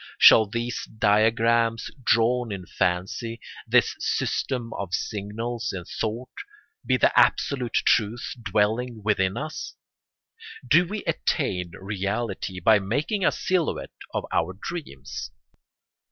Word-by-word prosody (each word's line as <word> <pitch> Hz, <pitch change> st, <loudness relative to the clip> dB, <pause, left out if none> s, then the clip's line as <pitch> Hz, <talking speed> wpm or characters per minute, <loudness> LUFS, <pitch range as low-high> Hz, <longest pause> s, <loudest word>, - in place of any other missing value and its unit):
Shall 110 Hz, -2 st, +8 dB
these 115 Hz, +3 st, -3 dB
diagrams 115 Hz, +2 st, +2 dB
drawn 120 Hz, 0 st, +2 dB
in 95 Hz, -3 st, -5 dB
fancy, 95 Hz, +8 st, -2 dB, 0.3 s
this -, -, +3 dB
system 120 Hz, -4 st, -1 dB
of 100 Hz, -1 st, -3 dB
signals 110 Hz, +3 st, -3 dB
in 90 Hz, -3 st, -6 dB
thought, 115 Hz, +6 st, -4 dB, 0.5 s
be -, -, +2 dB
the -, -, +4 dB
Absolute 125 Hz, -5 st, +2 dB
Truth 115 Hz, +2 st, +1 dB
dwelling 110 Hz, +3 st, 0 dB
within 100 Hz, -1 st, +1 dB
us? 155 Hz, +3 st, -5 dB, 0.9 s
Do 175 Hz, +1 st, +5 dB
we 210 Hz, +3 st, -4 dB
attain 90 Hz, -2 st, -1 dB
reality 100 Hz, -1 st, -3 dB
by 105 Hz, +4 st, +5 dB
making 140 Hz, -, -1 dB
a -, -, +4 dB
silhouette 185 Hz, -4 st, -1 dB, 0.2 s
of -, -, -2 dB
our 90 Hz, +3 st, 0 dB
dreams? 70 Hz, -, -6 dB
110 Hz, 110 wpm, -25 LUFS, 100-120 Hz, 0.9 s, Shall